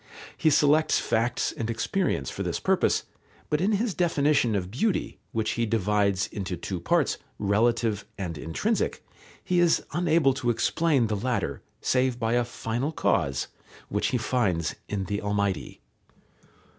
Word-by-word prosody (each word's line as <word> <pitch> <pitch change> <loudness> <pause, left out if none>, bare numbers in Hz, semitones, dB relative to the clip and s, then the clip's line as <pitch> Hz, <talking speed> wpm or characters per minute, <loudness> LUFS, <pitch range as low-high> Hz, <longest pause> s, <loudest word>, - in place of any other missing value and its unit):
He 160 - +3
selects 150 +1 +4
facts 115 +2 0
and 115 0 -4
experience 115 - -1
for - - -6
this - - -2
purpose, - - +2 0.5
but 150 +1 +2
in 205 +4 +2
his 210 +1 0
definition 145 -9 +2
of 95 -2 -2
beauty, 185 - -1
which 110 -1 -1
he 115 -1 0
divides 105 -2 +1
into 95 -3 -5
two 90 +1 -4
parts, 85 - +1 0.2
relative 110 +1 +1
and 90 -4 -4
intrinsic, 80 - -1 0.4
he 180 -1 +1
is 175 -1 +3
unable 160 -4 +3
to 125 -2 -2
explain 140 +2 +2
the 110 -1 -1
latter, 125 +4 -2 0.2
save 130 -1 +1
by 115 -1 0
a 120 0 +3
final 120 +4 -3
cause, 70 - 0 0.4
which 105 - 0
he 125 - +1
finds 100 -9 0 0.2
in 100 -2 -2
the 100 +2 -3
Almighty. 100 -2 -2
115 Hz, 145 wpm, -27 LUFS, 100-150 Hz, 0.5 s, selects